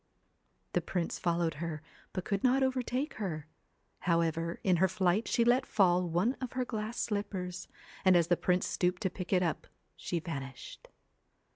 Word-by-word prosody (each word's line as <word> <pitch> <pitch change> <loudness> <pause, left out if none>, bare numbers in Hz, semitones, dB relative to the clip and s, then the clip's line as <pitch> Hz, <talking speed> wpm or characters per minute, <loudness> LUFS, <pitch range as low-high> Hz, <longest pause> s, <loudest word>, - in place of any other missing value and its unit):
The - - +2
prince 175 -3 -2
followed 170 -2 +1
her, 160 -2 -4 0.3
but 185 - -4
could 200 -1 -1
not 265 +1 +4
overtake 260 +2 0
her; 165 -8 -3 0.5
however, 165 -1 0
in 185 -2 +4
her 190 +3 +4
flight 190 +2 +1
she 235 - +2
let 245 +2 +4
fall 180 -3 +3
one 180 +9 +2
of 255 - -4
her 255 0 0
glass 220 0 -4
slippers, 185 -4 -3 0.4
and 185 -2 +6
as 170 -1 +5
the 175 - +3
prince 180 +1 +1
stooped 180 0 0
to 190 - +1
pick 180 -1 -6
it 185 -2 +4
up 170 - -2 0.3
she 175 - -3
vanished. 135 -6 -7
180 Hz, 165 wpm, -32 LUFS, 170-215 Hz, 0.5 s, and